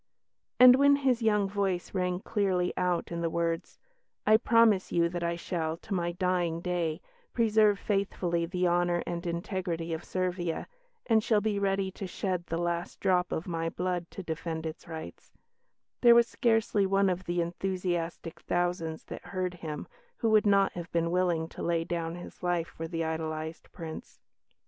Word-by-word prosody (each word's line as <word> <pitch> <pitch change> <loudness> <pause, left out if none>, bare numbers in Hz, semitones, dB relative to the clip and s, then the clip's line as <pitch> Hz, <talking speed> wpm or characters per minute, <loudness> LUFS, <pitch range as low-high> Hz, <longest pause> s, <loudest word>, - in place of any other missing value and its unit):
And 250 0 +10
when 280 +1 +6
his 260 -4 +1
young 210 -3 +3
voice 195 -3 -2
rang 180 -1 -1
clearly 190 -5 0
out 180 -2 0
in 170 0 -3
the 165 - 0
words, 165 +1 -2 0.5
"I 215 - +6
promise 225 -4 +4
you 170 0 +2
that 175 0 -4
I 170 0 0
shall, 165 -2 -3
to 190 - -7
my 175 -2 -1
dying 180 -2 0
day, 170 -2 -2 0.3
preserve 215 -3 +4
faithfully 190 -5 -1
the 180 0 0
honour 175 0 +2
and 175 +1 -4
integrity 170 -1 -3
of 160 - -4
Servia, 180 -3 -2 0.4
and 220 -3 +3
shall 215 -2 +3
be 205 -1 0
ready 195 -1 0
to 190 +1 -6
shed 180 -1 -3
the 165 - -2
last 175 0 -2
drop 180 -1 +2
of 160 - -2
my 165 -1 -1
blood 175 0 -2
to 195 - -8
defend 160 -1 -4
its 160 +2 -6
rights," 160 -1 -9 0.7
there 235 -1 +8
was 235 0 +6
scarcely 225 -4 +2
one 195 +1 +3
of 185 0 -1
the 175 0 -1
enthusiastic 175 -1 -3
thousands 175 -2 -1
that - - -8
heard 185 -2 -3
him 160 -4 -6 0.3
who 225 - +1
would 215 -1 +5
not 200 -1 +4
have 175 -1 -7
been 170 0 0
willing 175 -3 +1
to - - -9
lay 170 -1 +1
down 165 -1 -3
his 175 - -10
life 175 -2 0
for 165 - -6
the 165 0 -2
idolised 160 0 -4
Prince. 160 -2 -8
175 Hz, 175 wpm, -29 LUFS, 170-195 Hz, 0.7 s, And